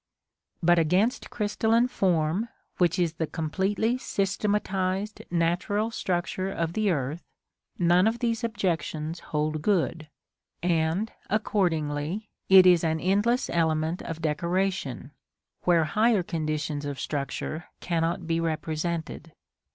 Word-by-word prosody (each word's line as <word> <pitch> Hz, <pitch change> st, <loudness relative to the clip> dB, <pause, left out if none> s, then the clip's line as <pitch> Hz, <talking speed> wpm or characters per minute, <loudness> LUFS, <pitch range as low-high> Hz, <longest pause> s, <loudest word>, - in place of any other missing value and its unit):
But 175 Hz, +1 st, +5 dB
against 185 Hz, +9 st, +1 dB
crystalline 225 Hz, +2 st, +1 dB
form, 185 Hz, -1 st, +1 dB, 0.3 s
which 175 Hz, 0 st, +3 dB
is 170 Hz, -3 st, +1 dB
the 160 Hz, -1 st, -2 dB
completely 195 Hz, +10 st, -1 dB
systematised 195 Hz, -1 st, -1 dB
natural 175 Hz, +6 st, 0 dB
structure 185 Hz, -2 st, -2 dB
of 165 Hz, -3 st, -2 dB
the 215 Hz, 0 st, +1 dB
earth, 150 Hz, 0 st, -1 dB, 0.6 s
none 175 Hz, +3 st, +4 dB
of 225 Hz, +1 st, +1 dB
these 230 Hz, -1 st, -1 dB
objections 165 Hz, -7 st, -2 dB
hold 155 Hz, 0 st, -2 dB
good, 165 Hz, -4 st, 0 dB, 0.5 s
and, 170 Hz, +4 st, +1 dB, 0.2 s
accordingly, 175 Hz, -3 st, -1 dB, 0.2 s
it 190 Hz, -1 st, +9 dB
is 180 Hz, -2 st, +6 dB
an 160 Hz, -1 st, +1 dB
endless 205 Hz, -, +2 dB
element 160 Hz, 0 st, +1 dB
of 165 Hz, 0 st, -6 dB
decoration, 170 Hz, -3 st, -1 dB, 0.5 s
where 170 Hz, -2 st, +4 dB
higher 215 Hz, +5 st, +2 dB
conditions 155 Hz, -3 st, -2 dB
of 140 Hz, -2 st, -4 dB
structure 150 Hz, +4 st, -3 dB
cannot 170 Hz, 0 st, -1 dB
be 165 Hz, 0 st, 0 dB
represented. 160 Hz, 0 st, -3 dB
175 Hz, 110 wpm, -27 LUFS, 160-200 Hz, 0.6 s, it